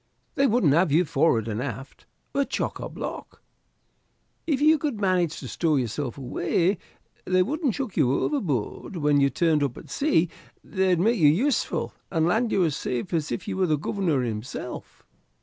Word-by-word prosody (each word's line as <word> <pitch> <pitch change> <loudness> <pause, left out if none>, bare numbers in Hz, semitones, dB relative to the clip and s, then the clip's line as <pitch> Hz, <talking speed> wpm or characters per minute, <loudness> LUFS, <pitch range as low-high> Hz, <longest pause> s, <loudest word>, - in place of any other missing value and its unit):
They 275 - +3
wouldn't 210 - +3
have 170 0 +3
you 170 +5 +4
forward, 135 -7 +2
and 110 +1 -2
aft 135 0 -7 0.3
we're 280 0 +1
chock - - -3
a - - -5
block. - - -7 1.0
If 290 -5 +1
you 310 +1 +5
could 275 -7 -2
manage 180 -5 +1
to - - -7
stow 160 -3 0
yourself 125 0 -2
away 170 +8 0 0.5
they 185 0 +3
wouldn't 285 - -1
chuck 260 -8 -4
you 135 -6 +3
overboard 155 - -2
when 150 -3 +2
you 140 - +4
turned 160 0 +2
up 140 -4 -1
at - - -11
sea; 275 - +2 0.4
they'd 190 -3 +1
make 225 +4 +2
you 155 - +6
useful 225 - +1 0.2
and 160 -3 +1
land 220 +7 +1
you 185 - +3
as 155 -4 0
safe 125 +9 -3
as 160 -3 -1
if 120 - -4
you - - -3
was 185 -3 +1
the 155 - +3
Governor 160 -4 0
himself." 115 +2 -6
170 Hz, 180 wpm, -25 LUFS, 140-210 Hz, 1.0 s, you